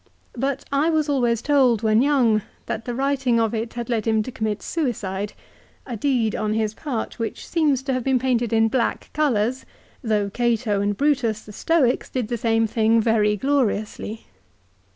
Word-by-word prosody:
But 270 +2 -2
I 285 +3 +2
was 315 -2 +1
always 240 -5 +1
told 255 -6 +3
when 220 +1 +4
young 250 -6 +3 0.2
tLat 220 - -4
the 245 - -3
writing 270 -3 +1
of 225 -1 +1
it 225 +1 -3
had 240 -1 -4
led 230 -3 -1
him 220 -1 +2
to 255 - -7
commit 220 -3 -3
suicide, 210 - -2 0.5
a 245 - -5
deed 230 -2 0
on 215 0 -1
his 220 -1 0
part 250 -3 -5
which 230 - -4
seems 295 -6 +1
to 270 -1 -1
have 255 -1 -1
been 265 0 +2
painted 245 -2 0
in 225 0 +4
black 235 +1 -1
colours, 255 -4 +1 0.4
though 210 -3 0
Cato 230 -3 0
and 205 0 -1
Brutus, 260 -7 +1
the 210 - -11
Stoics, 275 -1 +1
did 245 -4 -3
the 240 - -1
same 225 0 +2
thing 225 +1 +2
very 215 -2 +2
gloriously. 225 -4 -1
235 Hz, 175 wpm, -23 LUFS, 220-265 Hz, 0.5 s, when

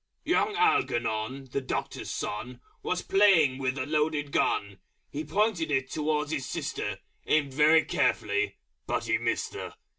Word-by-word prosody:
_ - - -55 0.2
Young 420 - +2
Algernon, 130 - 0
the 140 - -1
Doctor's 130 - -4
Son, 120 +4 -4 0.2
Was 180 0 -2
playing 170 -10 +4
with 130 0 -1
a 130 - -2
Loaded 150 -1 0
Gun. 100 -6 0 0.3
He 150 +2 -4
pointed 175 +1 0
it 135 -2 0
towards 150 -1 -1
his 145 -4 -2
sister, - - -3 0.3
Aimed 145 -3 +2
very 155 +3 +5
carefully, 415 0 0 0.3
but - - -1
Missed - - 0
her! - - -7
150 Hz, 145 wpm, -28 LUFS, 130-160 Hz, 0.3 s, very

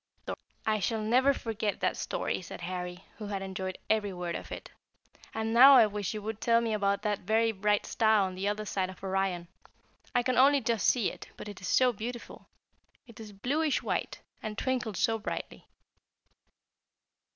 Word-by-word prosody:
"I 215 -1 +2
shall 220 +2 -1
never 255 +5 +4
forget 220 -5 -2
that - - +1
story," - - -2
said 180 - -9
Harry, 180 0 -5
who 210 - -6
had 200 -1 -3
enjoyed 190 -1 -4
every 215 -2 +1
word 175 -2 -4
of - - -6
it; - - -7 0.6
"and 220 0 -2
now 270 +4 +9
I 240 -4 +8
wish 210 -1 -3
you 210 - -5
would 220 0 -5
tell 230 -1 +4
me 230 -1 -1
about 200 -1 0
that 210 -2 0
very 225 +3 +2
bright 210 0 +1
star 220 -2 +3
on 185 -1 -2
the 190 +2 -3
other 210 +1 -1
side 190 -2 -1
of 185 - -12
Orion. 190 -2 -1 0.7
I 245 - +3
can 255 +1 0
only 280 +2 +6
just 230 -3 0
see 240 -6 +3
it, - - -11
but - - -8
it 205 -2 -9
is 185 - -5
so 255 -1 +4
beautiful. 235 +3 -7 0.6
It 235 -4 -15
is 215 -2 -9
bluish 275 +9 0
white, - - -2 0.2
and 215 -1 -5
twinkles 250 -6 -1
so 225 -2 +1
brightly." 210 - -6
215 Hz, 185 wpm, -30 LUFS, 195-230 Hz, 0.7 s, now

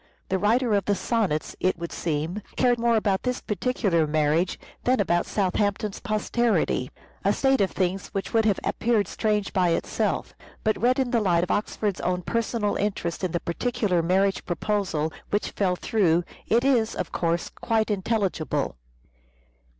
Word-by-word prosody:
The 190 - +1
writer 230 +3 +2
of 200 -1 +2
the 205 - +2
Sonnets, 195 -8 -1
it 185 - +1
would 170 0 -5
seem, 165 +5 -2
cared 245 -2 +3
more 235 0 +3
about 205 -3 +1
this 250 0 -1
particular 200 -7 0
marriage 155 +3 +1 0.2
than 255 0 +2
about 175 -3 +1
Southampton's 205 +1 0
posterity: 215 - 0 0.3
a 200 - +3
state 270 +3 +2
of 195 - +3
things 185 0 -1
which 195 - -4
would 225 -1 +3
have 205 -3 +2
appeared 225 -3 +1
strange 210 -2 -1
by 180 -2 +3
itself, 165 - -1 0.3
but 215 -3 0
read 250 +2 +3
in 260 -3 0
the 235 -3 +2
light 175 -4 +2
of 180 - -2
Oxford's 205 -1 -1
own 180 0 -1
personal 230 0 -1
interest 195 -4 -2
in 185 - 0
the 170 - 0
particular 205 0 0
marriage 190 +3 +1
proposal 175 -4 -1 0.2
which 205 - -1
fell 185 -3 +1
through, 175 -5 +2 0.2
it 235 +2 +3
is, 245 -5 +2
of - - -4
course, 170 0 -1
quite 220 -2 0
intelligible. 195 - -1
200 Hz, 160 wpm, -25 LUFS, 175-225 Hz, 0.3 s, cared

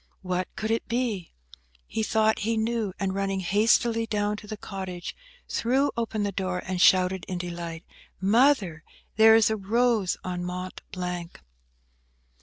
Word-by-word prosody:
What 185 0 -1
could 220 +1 -2
it 225 - -1
be? 230 -7 -2 0.5
He 220 - -3
thought 220 0 +2
he 225 +2 0
knew; 220 -2 0
and 195 -1 -1
running 195 0 -1
hastily 225 +4 +2
down 210 -1 0
to 210 - -11
the 215 0 -6
cottage, 190 -4 -6 0.3
threw 265 +5 +1
open 225 -2 -2
the 200 - -1
door, 185 -1 -2
and 185 -1 -2
shouted 185 0 +4
in 185 - -3
delight, 170 -2 -5 0.4
"Mother! 200 - +3 0.3
there 220 0 +8
is 225 -1 +4
a - - +1
rose 220 -1 +1
on 180 -1 -3
Mont 180 +1 -5
Blanc!" 180 -2 -5
200 Hz, 150 wpm, -26 LUFS, 180-225 Hz, 0.5 s, there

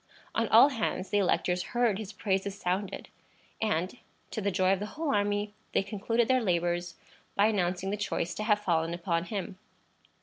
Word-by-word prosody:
On - - +1
all 280 - +8
hands 215 -7 -2
the 205 - +3
electors 180 -1 +1 0.2
heard 230 -5 +3
his 215 -2 -6
praises 195 -2 -1
sounded, 185 +2 -2 0.5
and, 200 +1 -1 0.3
to 220 - -3
the 200 - +1
joy 185 0 +3
of 195 - -1
the 210 - -3
whole 310 -3 0
army, 205 0 0 0.2
they - - +3
concluded 220 +3 0
their 255 -1 +3
labors 175 -3 0 0.4
by 200 - +4
announcing 190 -2 0
the 205 - -1
choice 175 -4 -2
to 215 - -4
have 210 -2 +3
fallen 170 -4 0
upon 170 -1 -1
him. 190 -3 -5
200 Hz, 175 wpm, -29 LUFS, 180-210 Hz, 0.5 s, all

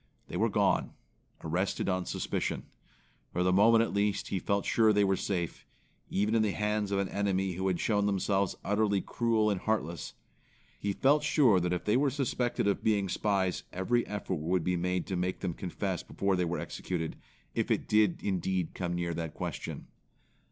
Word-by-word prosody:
They - - -6
were - - +2
gone; - - +1 0.5
arrested 90 +5 -1
on 90 -1 0
suspicion. - - -2 0.7
For 90 - 0
the 90 0 +3
moment 110 +4 +6
at - - -3
least 100 0 0
he 95 - -1
felt 100 +2 0
sure 110 -2 +4
they 105 -1 +3
were 95 -1 +3
safe, 90 -3 -3 0.5
even 105 +3 +1
in 115 - +4
the 105 -3 +1
hands 105 -1 -1
of 100 - +1
an 100 -1 0
enemy 95 -2 0
who 95 +2 -2
had 90 -2 0
shown 105 -2 +1
themselves 100 -1 +1
utterly 105 0 +2
cruel 110 -1 +1
and 95 - -2
heartless. 85 -7 -2 0.6
He 100 - -1
felt 140 +8 +3
sure 125 - +4
that 90 0 -1
if 90 - -2
they 105 +3 +3
were 140 +1 +3
suspected 125 -5 -1
of 100 - 0
being 100 -3 +2
spies 95 -3 0
every 115 +7 +1
effort 100 -3 -3
would 85 +3 0
be 90 +1 +1
made 90 +1 -1
to 95 - -3
make 90 +1 -2
them 90 -3 -2
confess 95 +1 -3
before 100 -1 -1
they 90 -1 +1
were 85 +1 -2
executed, 80 -3 -4 0.4
if - - -1
it - - 0
did 105 -4 +3
indeed 95 -2 -1
come 85 -1 -2
near 85 -1 -1
that 80 -1 -4
question. - - -5
100 Hz, 185 wpm, -30 LUFS, 90-105 Hz, 0.7 s, moment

